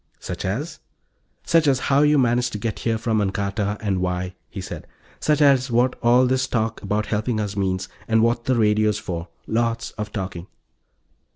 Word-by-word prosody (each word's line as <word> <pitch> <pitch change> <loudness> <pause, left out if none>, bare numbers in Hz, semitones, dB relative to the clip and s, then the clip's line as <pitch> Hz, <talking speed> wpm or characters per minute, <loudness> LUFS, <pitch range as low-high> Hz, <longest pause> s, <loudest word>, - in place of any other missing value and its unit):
"Such 90 - -5
as?" 140 - -3 0.6
"Such 165 -2 +3
as 135 -2 +3
how 140 - +5
you 150 0 +4
managed 125 -1 +2
to - - -2
get 110 0 -3
here 115 -1 0
from 110 -1 0
Ancarta, 100 +1 -1
and 100 -3 0
why," 90 0 -2 0.2
he - - -7
said. - - -7 0.3
"Such 150 -1 +2
as 135 -2 +4
what 125 +2 +2
all 120 +2 +5
this 130 +1 +1
talk 115 -3 -1
about 105 +1 -1
helping 110 +1 -1
us 105 -2 -3
means, 95 -1 -1 0.2
and 110 0 +3
what 115 0 +1
the 130 - +2
radio's 105 -2 +2
for. 85 -2 -5 0.2
Lots 115 +1 -1
of 105 0 -4
talking." 95 -4 -5
110 Hz, 180 wpm, -23 LUFS, 100-125 Hz, 0.6 s, how